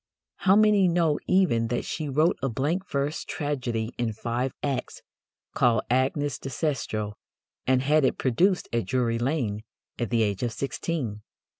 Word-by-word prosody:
How 195 0 +4
many 210 -3 +5
know 165 -3 +2
even 145 -12 +3
that 120 +1 -2
she 155 -3 -3
wrote 155 +6 +3
a 135 - 0
blank 155 - -1
verse 140 +2 -1
tragedy 125 -6 -3
in 115 -2 0
five 120 +4 -2
acts, 135 -3 -3 0.5
called 115 -3 +3
Agnes 135 +3 +1
de 135 - -6
Cestro, 115 -6 -2 0.5
and 130 0 +3
had 150 +2 +3
it 130 - +2
produced 180 - +2
at 115 -1 0
Drury 120 -3 +1
Lane 120 -5 -1 0.4
at 120 - -1
the 115 -2 +2
age 100 -2 -1
of 120 -2 -1
sixteen? 135 -6 -3
130 Hz, 155 wpm, -26 LUFS, 115-155 Hz, 0.5 s, many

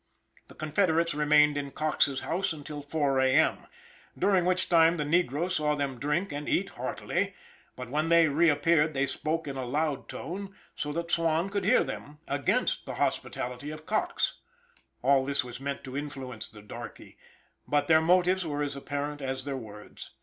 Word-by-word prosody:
The - - -15
confederates 165 +1 +1
remained 150 0 +4
in 140 -1 -3
Coxe's 140 -2 +1
house 180 0 -1
till 150 -1 -6
4 145 -2 0
A. 130 0 +3
M., 160 - +2 0.5
during 190 -2 +3
which 185 0 +2
time, 165 0 +5
the 150 - 0
negro 170 +2 +1
saw 150 -4 +1
them 140 -4 -3
drink 150 +7 -1
and 145 +1 -4
eat - - +1
heartily; - - -2 0.4
but 125 -1 -8
when 155 +3 0
they 170 -1 +6
reappeared 155 0 +3
they 135 +1 +2
spoke 155 +3 -2
in 135 -1 -4
a 130 - -2
loud 145 +2 -1
tone, 195 +3 -6 0.2
so 150 - -3
that 170 +1 -3
Swan 165 +2 +1
could 200 -1 -1
hear 245 +6 +5
them, 150 +1 -7
against 140 -2 0
the - - -4
hospitality 125 +4 -2
of 155 0 -8
Coxe. 215 - 0 0.6
All 135 -1 +4
this 140 +1 0
was 125 -1 -8
meant 140 0 -4
to 130 0 -8
influence 135 -5 -5
the 105 -2 -13
darkey; 105 - -10 0.5
but 145 0 +1
their 160 -1 +6
motives 180 +2 +3
were 150 -3 -2
as 145 -1 -3
apparent 145 +1 -4
as 130 0 -3
their 140 -1 -3
words. 105 -4 -10
150 Hz, 175 wpm, -29 LUFS, 140-165 Hz, 0.6 s, they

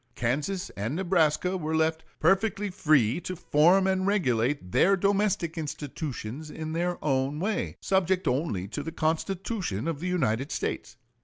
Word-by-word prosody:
Kansas 150 +11 -1
and 110 +8 -3
Nebraska 180 0 +2
were 160 -2 -2
left 160 0 +1 0.2
"perfectly 195 +4 +2
free 155 - +2
to 185 +2 -5
form 175 +3 +4
and 190 0 +1
regulate 125 - +1
their 195 - +4
domestic 195 -4 +1
institutions 150 -2 -5
in 155 0 -5
their 175 +1 -1
own 135 +1 0
way, 210 +5 -2
subject 190 -1 +1
only 125 - 0
to 130 +8 -5
the 160 +3 -5
Constitution 165 - -2
of 165 -4 -2
the 180 - -3
United 135 -7 0
States." - - -3
160 Hz, 145 wpm, -27 LUFS, 145-185 Hz, 0.2 s, form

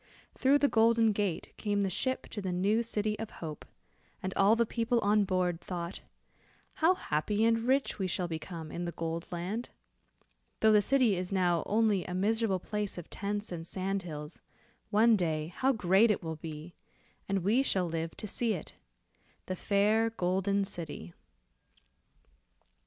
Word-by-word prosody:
Through 270 +2 +4
the 285 - +3
Golden 225 -2 +4
Gate, 200 -5 -2
came 205 -1 0
the 195 - 0
ship 260 +8 -1
to 210 - -5
the 190 -2 -2
new 200 +6 +2
city 215 -2 -2
of 225 -1 -4
hope, 155 -3 -7 0.6
and 190 0 -2
all 200 +3 +4
the 235 0 +2
people 235 +1 0
on 205 0 +3
board 180 -3 0
thought, 175 -1 -5 0.8
"how 345 +4 +5
happy 205 - 0
and 230 +1 +2
rich 265 -3 +1
we 190 - 0
shall 180 0 -1
become 160 -1 -6
in 175 - -4
the 170 - -3
Gold 165 +1 -4
Land. 185 +7 -3 0.9
Though 220 - +6
the 210 -1 +6
city 250 -3 +3
is 180 +1 -4
now 175 -3 +2
only 210 -3 +2
a 180 - -5
miserable 210 +1 +1
place 210 +2 -4
of 175 - -8
tents 205 +1 -3
and 165 -1 -6
sand 195 +2 -2
hills, 150 -2 -7 0.5
one 220 +2 +5
day 160 -3 -1
how 265 +1 +2
great 205 -1 +4
it 210 - 0
will 160 -1 -4
be, 160 +1 -8 0.6
and 195 -2 0
we 220 +8 +3
shall 190 -9 +1
live 165 0 -4
to - - -6
see 225 +1 +1
it. 165 - -7 0.7
The 185 - -3
fair 210 +4 +2
Golden 195 0 0
City." 160 - -7
195 Hz, 165 wpm, -31 LUFS, 175-220 Hz, 0.9 s, Though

